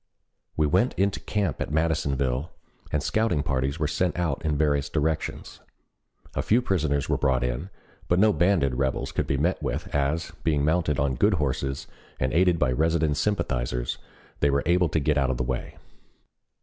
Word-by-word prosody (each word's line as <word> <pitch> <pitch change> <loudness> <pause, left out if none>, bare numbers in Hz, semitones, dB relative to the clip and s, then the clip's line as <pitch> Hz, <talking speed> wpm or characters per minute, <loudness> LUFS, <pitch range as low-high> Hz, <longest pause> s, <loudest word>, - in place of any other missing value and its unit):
We 75 - +3
went 120 - +2
into 100 +1 +1
camp 100 -7 -2
at - - -2
Madisonville, 70 -3 0 0.4
and 75 -2 0
scouting 110 -6 +1
parties 70 -1 -1
were 75 -2 0
sent 90 +3 -1
out 85 -2 -1
in 75 -2 0
various 70 -2 +1
directions. 80 0 -2 0.7
A - - -1
few 115 - +3
prisoners 80 - 0
were - - 0
brought 65 -3 +2
in, 60 +9 -2 0.4
but 90 - +2
no 105 +2 +5
banded 85 -5 +2
rebels 65 0 -1
could - - -2
be 70 - 0
met 85 +7 0
with, - - -3
as, 70 +3 0
being 75 -3 +1
mounted 80 -2 +1
on 70 -1 +1
good - - +3
horses 70 -2 -2 0.3
and 65 0 0
aided 90 +1 +4
by 65 -6 +2
resident 80 +2 +1
sympathizers, 60 -9 -1 0.4
they 70 - +3
were 70 0 +1
able 90 0 +3
to 80 - +1
get 75 0 +1
out 70 -1 +1
of 65 - -1
the 65 - -1
way. - - -4
75 Hz, 175 wpm, -26 LUFS, 70-85 Hz, 0.7 s, no